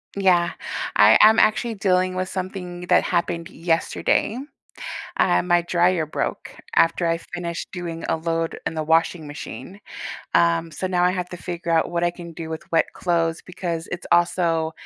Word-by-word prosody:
Yeah, 180 -3 +3 0.4
I 105 +2 +7
I'm 220 +1 +7
actually 220 +2 +2
dealing 185 -2 +1
with 185 0 -2
something 185 -1 -5
that - - +5
happened 170 -1 -1
yesterday. 165 +6 0 0.8
Uh, - - +3
my 175 -1 +3
dryer 175 -1 +2
broke 155 - -4 0.2
after 165 +1 +3
I 165 0 +1
finished 170 0 -6
doing 170 -2 -5
a - - +1
load 165 0 -2
in - - -2
the 155 - -2
washing 160 +1 +1
machine, 180 +6 -8 0.5
um, 85 - +3
so 160 +5 -4
now 180 -1 +1
I 180 - +4
have 180 -1 -3
to 180 - -6
figure 170 -1 -4
out 165 0 +2
what 170 0 0
I 175 - +2
can 170 -1 -10
do 160 0 -7
with 160 - -5
wet 165 - +4
clothes 165 -2 0
because 170 -2 -4
it's 175 - -5
also 170 -2 +2
175 Hz, 170 wpm, -23 LUFS, 165-180 Hz, 0.8 s, I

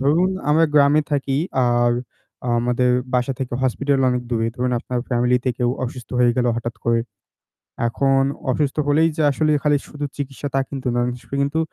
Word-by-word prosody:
ধরুন 160 +7 +3 0.2
আমরা 160 +2 +5
গ্রামে 145 +1 +5
থাকি 140 -1 0 0.3
আর 120 0 +3 0.7
আমাদের 125 +1 +1 0.2
বাসা 125 +2 +1
থেকে 130 -3 -4
হসপিটাল 135 +2 +1
অনেক 125 0 -1
দূরে। 115 -2 0
ধরুন 125 -1 0
আপনার 125 0 -3
ফ্যামিলিতে 125 +1 +1
কেউ 120 -1 +1
অসুস্থ 125 -1 -8
হয়ে 120 -1 +4
গেলো 125 -1 +2
হঠাৎ 120 0 -4
করে, 115 0 +2 0.9
এখন 135 +2 +2 0.3
অসুস্থ 140 +2 -1
হলেই 155 +3 +4
যে - - +1
আসলে 155 +3 +1
খালি 145 -1 +3
শুধু 145 0 -5
চিকিৎসা, 140 0 -4
তা 135 - +2
কিন্তু 135 -2 -5
নয়। 120 0 +1
অনেক 125 0 -3
সময় 140 - -4
কিন্তু 140 +3 -1
130 Hz, 175 wpm, -21 LUFS, 120-145 Hz, 0.9 s, আমরা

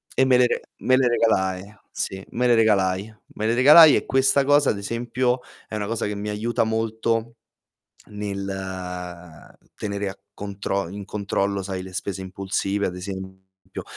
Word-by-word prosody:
E 130 - +4
me 130 -1 +5
le 125 - +5
re - - -2 0.2
me 130 - +3
le 130 -1 +3
regalai, 100 -4 0 0.2
sì, 95 0 -4
me 125 +1 +1
le 120 - +5
regalai. 100 -2 +2 0.2
Me 110 - -3
le 115 - +2
regalai 150 +5 +9
e - - 0
questa 135 +1 +3
cosa, 145 +1 +4
ad - - 0
esempio, 120 +4 -1 0.3
è - - -6
una 105 -1 -2
cosa 115 0 -2
che 105 0 -3
mi 105 +1 -4
aiuta 110 +3 0
molto 115 +1 -1 0.7
nel 100 -1 -5 1.3
tenere 100 -1 -3
a 95 - -10
contro 100 -1 -3
in 100 +1 -7
controllo, 100 -1 -2
sai, 95 -1 -4
le 95 0 -10
spese 95 0 -4
impulsive, 95 +1 -2
ad 90 - -5
esempio, 95 0 -9
105 Hz, 165 wpm, -23 LUFS, 95-115 Hz, 1.3 s, regalai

